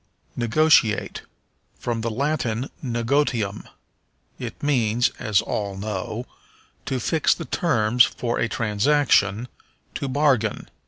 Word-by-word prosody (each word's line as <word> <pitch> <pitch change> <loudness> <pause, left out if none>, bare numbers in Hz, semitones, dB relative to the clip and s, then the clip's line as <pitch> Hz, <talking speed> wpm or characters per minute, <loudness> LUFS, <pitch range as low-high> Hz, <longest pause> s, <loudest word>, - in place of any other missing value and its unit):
Negotiate. 120 -2 +2 0.6
From 115 -2 -3
the 115 - -1
Latin 130 -1 -2
negotium. 120 -4 0 0.7
It - - -7
means, 120 -5 +2
as 105 -3 +2
all 100 -2 -3
know, 105 +3 -4 0.6
to 130 - -1
fix 155 +6 +2
the - - -7
terms 120 -7 +3
for 120 -1 -2
a 115 - 0
transaction, 115 -1 +2 0.5
to 140 - -3
bargain. 130 -6 +1
120 Hz, 105 wpm, -23 LUFS, 110-140 Hz, 0.7 s, terms